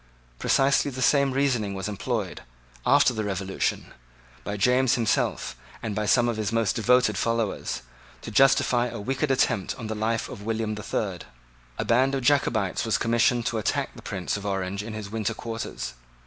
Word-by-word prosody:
Precisely 140 Hz, +1 st, +3 dB
the 130 Hz, -1 st, -7 dB
same 140 Hz, +1 st, +3 dB
reasoning 125 Hz, -7 st, 0 dB
was 95 Hz, 0 st, -3 dB
employed, 105 Hz, -1 st, -3 dB, 0.5 s
after -, -, +5 dB
the 110 Hz, -2 st, -2 dB
Revolution, 95 Hz, -1 st, -2 dB, 0.5 s
by 105 Hz, -, -4 dB
James 125 Hz, +4 st, +3 dB
himself 115 Hz, -4 st, 0 dB, 0.3 s
and 110 Hz, -2 st, -2 dB
by 105 Hz, +1 st, -2 dB
some 120 Hz, +1 st, +4 dB
of 115 Hz, -2 st, -1 dB
his 105 Hz, -1 st, -1 dB
most 115 Hz, -2 st, +1 dB
devoted 120 Hz, -3 st, +3 dB
followers, 115 Hz, -, -1 dB, 0.4 s
to -, -, -6 dB
justify 125 Hz, 0 st, +4 dB
a 115 Hz, -2 st, -6 dB
wicked 135 Hz, +7 st, -1 dB
attempt 125 Hz, -7 st, +1 dB
on 115 Hz, -, -7 dB
the 110 Hz, -, -3 dB
life 110 Hz, +1 st, -1 dB
of -, -, -9 dB
William 110 Hz, 0 st, -2 dB
the 105 Hz, -, -6 dB
Third. 95 Hz, -4 st, -3 dB, 0.5 s
A -, -, -2 dB
band 130 Hz, +4 st, +3 dB
of 135 Hz, -, -2 dB
Jacobites 120 Hz, -8 st, +2 dB
was 110 Hz, -, +1 dB
commissioned 120 Hz, +1 st, +2 dB
to 115 Hz, -, 0 dB
attack 105 Hz, -, -1 dB
the -, -, -11 dB
Prince 95 Hz, -3 st, -3 dB
of 100 Hz, -, -8 dB
Orange 95 Hz, -1 st, -2 dB
in 110 Hz, +1 st, -7 dB
his 105 Hz, -2 st, -6 dB
winter 110 Hz, 0 st, -2 dB
quarters. 115 Hz, -, -5 dB
115 Hz, 175 wpm, -26 LUFS, 105-125 Hz, 0.5 s, after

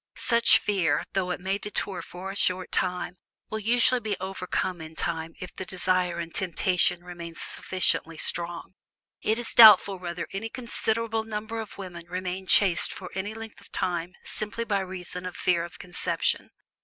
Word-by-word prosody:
Such 235 Hz, -1 st, +5 dB
fear, 185 Hz, -7 st, +1 dB
though 185 Hz, -1 st, 0 dB
it 180 Hz, -, -2 dB
may 190 Hz, +2 st, -1 dB
deter 200 Hz, -3 st, -3 dB
for 185 Hz, +2 st, -7 dB
a -, -, -8 dB
short 185 Hz, -2 st, +1 dB
time, 180 Hz, 0 st, -1 dB, 0.3 s
will 220 Hz, -, -2 dB
usually 245 Hz, +3 st, +3 dB
be 210 Hz, -4 st, -2 dB
overcome 185 Hz, -1 st, -3 dB
in 160 Hz, 0 st, -9 dB
time 165 Hz, 0 st, -2 dB
if 185 Hz, -, -8 dB
the -, -, -5 dB
desire 185 Hz, -1 st, +1 dB
and 170 Hz, -1 st, -5 dB
temptation 180 Hz, -1 st, +1 dB
remain 170 Hz, -2 st, -8 dB
sufficiently 165 Hz, -3 st, 0 dB
strong. 170 Hz, +2 st, -2 dB, 0.5 s
It 220 Hz, +1 st, +1 dB
is 240 Hz, -1 st, -1 dB
doubtful 205 Hz, -4 st, +9 dB
whether 175 Hz, -1 st, -4 dB
any 215 Hz, +4 st, -3 dB
considerable 225 Hz, -2 st, -1 dB
number 220 Hz, +1 st, -4 dB
of 220 Hz, -2 st, -7 dB
women 175 Hz, -3 st, -8 dB
remain 185 Hz, +1 st, -4 dB
chaste 185 Hz, -4 st, +5 dB
for 185 Hz, -2 st, -8 dB
any 205 Hz, +3 st, -4 dB
length 225 Hz, -1 st, -9 dB
of -, -, -18 dB
time 175 Hz, 0 st, -2 dB
simply 215 Hz, +2 st, -3 dB
by 205 Hz, -3 st, 0 dB
reason 180 Hz, -1 st, -4 dB
of 180 Hz, -, -8 dB
fear 170 Hz, -2 st, +2 dB
of 170 Hz, -, -8 dB
conception. 175 Hz, -1 st, -1 dB
185 Hz, 165 wpm, -27 LUFS, 175-210 Hz, 0.5 s, doubtful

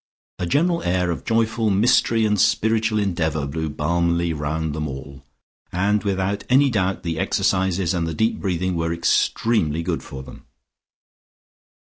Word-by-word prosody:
A 90 Hz, -, -2 dB
general 170 Hz, -, +1 dB
air 90 Hz, 0 st, 0 dB
of 85 Hz, -, -5 dB
joyful 115 Hz, -1 st, +1 dB
mystery 115 Hz, +2 st, +3 dB
and 105 Hz, -3 st, +2 dB
spiritual 110 Hz, 0 st, +2 dB
endeavour 80 Hz, -7 st, -1 dB
blew 80 Hz, +3 st, -3 dB
balmily 85 Hz, +2 st, 0 dB
round 80 Hz, +1 st, -2 dB
them 75 Hz, 0 st, -3 dB
all, 70 Hz, 0 st, -9 dB, 0.5 s
and 100 Hz, +3 st, +1 dB
without 100 Hz, 0 st, -1 dB
any 135 Hz, +2 st, +4 dB
doubt 95 Hz, -3 st, -1 dB
the 80 Hz, -2 st, -3 dB
exercises 95 Hz, -1 st, +1 dB
and 85 Hz, -2 st, -1 dB
the 80 Hz, -, -4 dB
deep 110 Hz, +7 st, 0 dB
breathing 90 Hz, -1 st, -1 dB
were 80 Hz, 0 st, -1 dB
extremely 85 Hz, 0 st, +1 dB
good 85 Hz, -1 st, -2 dB
for 65 Hz, -1 st, -9 dB
them. -, -, -13 dB
90 Hz, 145 wpm, -22 LUFS, 80-105 Hz, 0.5 s, any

